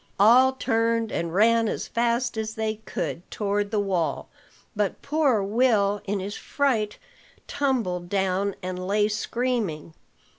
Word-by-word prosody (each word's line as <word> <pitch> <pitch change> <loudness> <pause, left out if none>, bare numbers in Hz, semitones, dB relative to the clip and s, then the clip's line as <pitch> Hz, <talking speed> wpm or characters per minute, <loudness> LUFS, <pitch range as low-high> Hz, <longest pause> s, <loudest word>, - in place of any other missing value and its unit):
All 250 +6 +6
turned, 230 -2 0
and 170 0 -2
ran 225 +4 +4
as - - -3
fast 235 +1 0
as 220 0 -3
they 220 -1 -2
could - - -3
toward 205 -1 -1
the 210 - 0
wall; 180 -7 -1 0.5
but 205 -2 -1
poor 280 -8 +2
Will 205 -2 +2
in 200 0 -1
his 195 +2 -5
fright 230 -7 -1 0.5
tumbled 220 -11 -1
down, 195 0 0
and 185 0 -4
lay 205 +1 +2
screaming. 215 -7 -2
210 Hz, 135 wpm, -25 LUFS, 195-235 Hz, 0.5 s, All